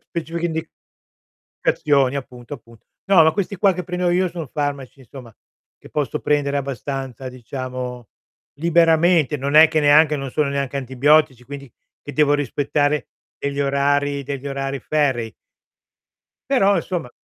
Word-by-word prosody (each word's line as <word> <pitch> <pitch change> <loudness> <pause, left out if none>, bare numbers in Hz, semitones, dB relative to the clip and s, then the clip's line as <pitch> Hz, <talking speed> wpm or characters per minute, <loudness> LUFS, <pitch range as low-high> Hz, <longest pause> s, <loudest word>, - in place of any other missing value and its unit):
Specifica 170 0 -4 0.9
indicazione 140 -2 0
appunto, 125 -1 -8
appunto. 115 -4 -17 0.2
No, 195 -4 +6
ma 160 0 +4
questi 200 +2 -3
qua 195 +1 +3
che 180 0 -5
prendo 180 0 -2
io 180 +1 +1
sono 170 -2 -6
farmaci, 140 -1 -4
insomma, 125 -3 -13 0.4
che - - -16
posso 150 0 -2
prendere 145 -1 0
abbastanza, 135 -1 -5
diciamo, 125 -1 -7 0.5
liberamente. 165 -1 +3
Non 140 +1 -3
è 155 +1 +8
che 160 0 +1
neanche 150 +1 +5
non 135 -1 -5
sono 145 +2 0
neanche 140 0 -3
antibiotici, 135 0 +2
quindi 140 -1 -9 0.3
che 145 - -8
devo 145 -1 +3
rispettare 145 +1 -1 0.3
degli 140 0 -3
orari 140 0 0
degli 140 0 -6
orari 135 0 -3
ferrei 130 -6 -1 1.2
però 200 -8 +3
insomma 170 -6 -3
145 Hz, 135 wpm, -21 LUFS, 135-155 Hz, 1.2 s, è